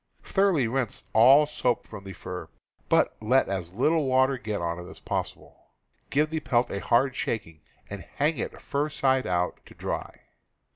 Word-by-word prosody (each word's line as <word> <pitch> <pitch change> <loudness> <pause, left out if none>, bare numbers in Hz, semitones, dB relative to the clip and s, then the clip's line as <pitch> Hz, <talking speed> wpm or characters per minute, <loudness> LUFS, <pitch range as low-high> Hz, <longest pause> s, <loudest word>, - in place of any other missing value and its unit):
Thor 200 0 +2
oughly 140 -9 +1
rinse 120 -1 -2
all 130 +7 +7
soap 125 -5 -1
from 105 -3 -10
the 95 - -7
fur, 90 -2 -7 0.4
but - - +3
let 125 +5 +3
as 90 -2 -4
little 150 +6 +2
water 130 0 +3
get 105 -3 -3
on 85 0 -2
it 90 +1 -9
as - - -11
possible. - - -5 0.4
Give 150 +2 +2
the 160 - -1
pelt 125 -5 +1
a 100 - -2
hard 125 +5 +2
shaking 80 -9 -3 0.3
and 100 -2 -7
hang 150 +2 +1
it - - -4
fur 145 +1 -2
side 130 -3 +1
out, 90 0 -1
to - - -15
dry. - - -5
120 Hz, 180 wpm, -27 LUFS, 95-140 Hz, 0.4 s, all